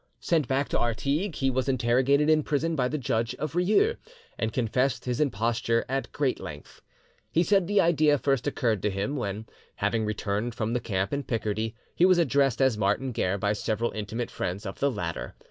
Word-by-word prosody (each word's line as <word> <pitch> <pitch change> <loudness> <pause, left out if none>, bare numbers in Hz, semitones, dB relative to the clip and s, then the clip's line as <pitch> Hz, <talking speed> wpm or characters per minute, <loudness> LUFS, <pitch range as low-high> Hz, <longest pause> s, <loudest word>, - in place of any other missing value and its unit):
Sent 160 -6 +1
back 135 +1 0
to - - 0
Artigues, 140 - -1
he 135 0 +2
was 130 +1 -1
interrogated 130 +4 +3
in 155 0 +4
prison 155 +3 -1
by 125 -4 +1
the 150 - -2
judge 115 -3 -1
of 155 - -4
Rieux, 215 - +3 0.4
and 110 -1 -2
confessed 125 +2 0
his 125 +2 -1
imposture 115 -2 +1
at 135 +1 -2
great 140 -3 0
length. 75 -1 -10 0.5
He 170 - +2
said 195 -1 +2
the 205 0 +4
idea 155 -3 +4
first 135 -1 0
occurred 115 -8 0
to 105 - +1
him 100 +8 -2
when, 105 -4 -3 0.3
having 115 -1 0
returned 105 +2 -2
from 110 +1 -2
the 125 - +1
camp 95 0 -2
in 140 - 0
Picardy, 110 -3 -2 0.2
he 175 - +4
was 185 -1 +5
addressed 140 -5 +2
as 125 -5 +2
Martin 105 +6 +1
Guerre 100 -4 0
by 100 +1 0
several 110 +2 -1
intimate 110 +3 -4
friends 95 +4 -4
of 95 - -6
the 140 - +2
latter. 90 -9 -4
125 Hz, 195 wpm, -27 LUFS, 110-145 Hz, 0.5 s, was